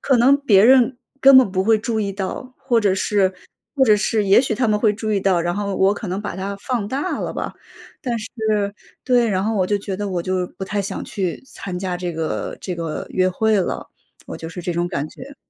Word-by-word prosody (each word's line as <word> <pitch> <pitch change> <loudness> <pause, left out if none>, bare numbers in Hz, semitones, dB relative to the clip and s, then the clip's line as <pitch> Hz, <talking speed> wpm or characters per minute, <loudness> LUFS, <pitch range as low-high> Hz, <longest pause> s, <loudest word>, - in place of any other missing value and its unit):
可 265 - +2
能 255 +4 +5
别 220 -8 +4
人 255 0 +5 0.2
根 270 0 +8
本 255 -7 +4
不 190 0 0
会 220 0 +4
注 225 0 -2
意 200 -2 -2
到， 210 +7 -5
或 240 -4 +1
者 200 -3 +2
是 190 -1 +1 0.4
或 270 -2 +4
者 215 -3 +5
是 210 +1 0
也 200 +4 +6
许 250 -4 -1
他 240 0 0
们 210 0 +2
会 210 -1 +3
注 215 0 -3
意 200 - +2
到， 185 -3 +2
然 175 +1 -1
后 200 -1 -2
我 195 +2 +3
可 205 - -7
能 185 +3 -2
把 205 - -5
它 195 +1 -4
放 225 0 -3
大 280 - -2
了 - - -3
吧。 - - -5 0.5
但 240 -2 -1
是 215 - -6 0.8
对， 245 -3 +3
然 190 -1 0
后 220 +1 0
我 185 - +2
就 205 +2 +1
觉 195 -1 -5
得 205 +1 -3
我 180 -3 -2
就 185 0 -1
不 190 - -3
太 205 +1 -2
想 195 0 -5
去 190 -2 -3
参 185 -8 -7
加 185 -1 -3
这 175 -1 -4
个 160 -1 -3
这 185 - -4
个 165 -2 -4
约 185 0 +2
会 215 +3 +1
了， - - -3 0.4
我 - - -6
就 165 - -7
是 175 +1 -8
这 180 - -2
种 170 +1 -1
感 145 -2 -3
觉。 275 - -11
200 Hz, 260 characters per minute, -21 LUFS, 185-230 Hz, 0.8 s, 根